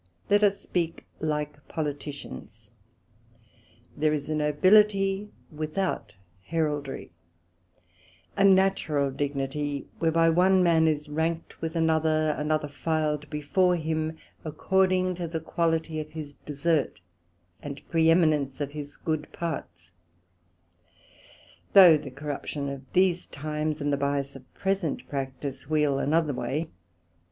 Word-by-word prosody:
Let 205 +1 +5
us 200 -1 +3
speak 170 -4 -3
like 150 -1 -3
Politicians, 145 - -6 1.2
there 155 +1 +2
is 145 -1 -3
a - - 0
Nobility 195 +6 +3 0.2
without 155 - -3 0.3
Heraldry, 150 - -2 1.2
a 195 - +2
natural 190 -7 +3
dignity, 140 +1 -2
whereby 165 0 +3
one 185 +2 +4
man 165 -2 +4
is 150 -1 0
ranked 160 +2 -3
with 165 0 -3
another; 160 -1 +2
another 150 0 0
filed 150 0 -1
before 175 +5 +2
him, 160 -1 -2 0.3
according 185 +3 +1
to 175 -2 -3
the 165 0 -3
quality 160 -1 -1
of 155 0 -5
his 150 -3 -7
Desert, 150 0 0 0.6
and 140 -1 -8
preheminence 160 -4 +3
of 145 -1 -3
his 145 -1 -8
good 155 -2 -3
parts: 90 - -5 1.8
Though 180 -5 +10
the 145 -2 -4
corruption 145 +1 -4
of 135 -1 -8
these 180 -1 +2
times, 150 +1 -3
and 145 0 0
the - - +2
byas 140 0 -1
of 135 -1 -13
present 195 -6 -1
practice 135 0 -5
wheel 150 -3 +2
another 155 +1 +1
way. 135 +6 -2
155 Hz, 115 wpm, -27 LUFS, 145-165 Hz, 1.8 s, Though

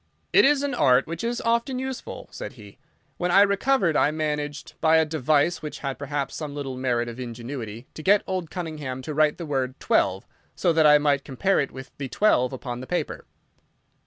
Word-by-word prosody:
"It - - +7
is 285 0 +3
an 285 - -1
art 130 -2 +4
which 165 +4 -6
is 235 0 -1
often 235 +3 0
useful," 265 0 -6
said - - -7
he. - - -14 0.4
"When 180 - -1
I 195 +3 +6
recovered 200 - +2
I - - +4
managed, 150 -1 -3
by 160 0 +5
a 160 - +4
device 155 +2 +1
which 150 - -6
had 135 -2 -4
perhaps 145 0 -3
some 150 -2 -5
little 135 -3 -4
merit 120 -2 0
of 120 +1 -7
ingenuity, 120 -1 -6
to - - -8
get 200 +5 +4
old 185 -4 -3
Cunningham 150 -8 -5
to 150 - -5
write 155 0 +3
the 170 - -6
word 135 -3 -2
'twelve,' - - +1 0.3
so 175 - +2
that 160 -1 +5
I 150 0 +8
might 145 -2 +1
compare 190 +9 +1
it 140 - 0
with 130 0 -10
the 140 - -3
'twelve' 125 -11 +2
upon 125 -2 -5
the 130 - -8
paper." 180 - -3
150 Hz, 200 wpm, -25 LUFS, 130-180 Hz, 0.4 s, I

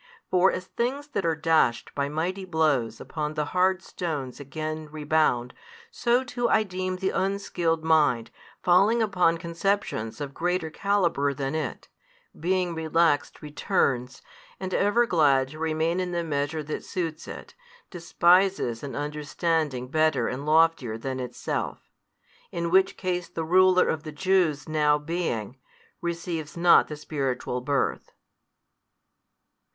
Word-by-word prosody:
For 185 +1 +4
as 185 - -4
things 265 +8 -3
that 200 -10 -1
are 165 - +1
dashed 160 -7 +1
by 140 0 -1
mighty 175 +6 -2
blows 150 -10 0
upon 150 -1 -4
the 150 - 0
hard 185 0 +2
stones 145 -8 -5
again 155 +3 -5
rebound, 150 -5 +1 0.4
so 245 - +1
too 240 -1 -2
I 220 - +4
deem 185 -1 -3
the 190 +1 -1
unskilled 180 -4 -1
mind 150 -8 +2 0.3
falling 200 +6 +4
upon 180 -5 +2
conceptions 170 - -2
of 140 -2 -5
greater 175 0 -1
calibre 170 -7 +1
than 135 +1 -3
it, 155 -5 -4 0.5
being 180 +1 0
relaxed 160 -2 +1
returns, 135 -5 -1 0.4
and 190 -1 -4
ever 220 +4 +3
glad 140 - +3
to 155 +2 -11
remain 160 +2 0
in 180 -1 -2
the 170 0 -1
measure 150 0 -2
that 150 +1 -5
suits 165 -3 -4
it, - - -9 0.4
despises 175 - +2
an 140 -2 -6
understanding 150 -2 -2
better 155 0 +2
and 135 +4 -4
loftier 155 -8 +3
than 130 +3 -4
itself. 125 -1 -4 0.6
In 170 0 -2
which 190 +1 +3
case 180 -2 -2
the 165 - -4
ruler 185 +2 +5
of 160 - -1
the 155 0 -7
Jews 165 -3 +1
now 150 -1 +3
being, 145 - -3 0.4
receives 170 -2 -4
not 170 0 +6
the 150 - -7
spiritual 135 -4 -3
birth. 140 +2 -1
160 Hz, 135 wpm, -26 LUFS, 145-185 Hz, 0.6 s, not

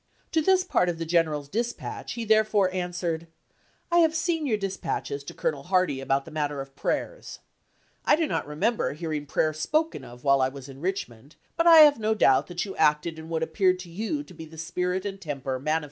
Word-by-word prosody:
To 320 - +2
this 370 +3 +3
part 180 - +1
of 170 - -2
the 165 - -4
general's 160 -4 +1
dispatch 235 +8 -4
he 235 -2 -4
therefore 215 -3 +3
answered: 175 -2 -3 0.6
"I 345 - +5
have 325 -1 +4
seen 325 -2 0
your 220 -5 +1
dispatches 190 -7 -3
to - - -8
Colonel 140 -2 -2
Hardie 180 -7 +1
about 135 +1 0
the 160 - -11
matter 145 -2 -2
of 135 0 -8
prayers. - - -3 0.7
I - - +5
do 325 +1 0
not 295 - -2
re 150 - -7
member 225 +1 0
hearing 155 -2 -4
prayer 155 +2 +1
spoken 305 - -1
of 120 0 -12
while 140 -1 +4
I 130 - +2
was 135 0 -10
in 135 0 -11
Richmond, 150 - -4 0.2
but 335 +1 +2
I 330 -2 +10
have 295 -4 +7
no 220 0 +1
doubt 160 +1 +2
you 195 - -7
acted 150 +2 +2
in 160 0 -10
what 160 -1 -1
Lweitznei!° - - +1
appeared 185 0 +3
to 180 - -11
you 225 - -3
to 185 - -15
be 160 -1 -9
the 160 +1 -14
spirit 180 +3 -2
and 195 -1 -5
temper 135 -5 -4
mani 155 +4 0
as. - - +2
170 Hz, 220 wpm, -26 LUFS, 145-215 Hz, 0.7 s, I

